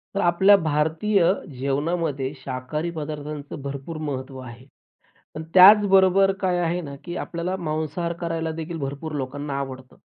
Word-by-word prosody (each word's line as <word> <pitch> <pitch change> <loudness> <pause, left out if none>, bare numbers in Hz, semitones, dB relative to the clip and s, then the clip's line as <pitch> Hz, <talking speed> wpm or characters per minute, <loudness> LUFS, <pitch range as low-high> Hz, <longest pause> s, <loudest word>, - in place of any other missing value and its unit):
तर 200 - +1
आपल्या 190 +3 +5
भारतीय 160 +5 +1 0.4
जेवणामध्ये 140 0 -1
शाकाहारी 135 +6 -4
पदार्थांचं 150 -2 -6
भरपूर 140 +3 -6
महत्त्व 135 -3 -5
आहे. 125 0 -11 0.7
पण 155 - -5
त्याचबरोबर 195 0 +7
काय 185 -2 +1
आहे 175 0 0
ना? 145 -5 -7
की 175 0 -6
आपल्याला 175 +2 -3
मांसाहार 160 0 -3
करायला 165 -1 -2
देखील 165 +1 -5
भरपूर 145 +2 -5
लोकांना 140 +1 -4
आवडतं 130 -2 -7
155 Hz, 130 wpm, -23 LUFS, 140-175 Hz, 0.7 s, त्याचबरोबर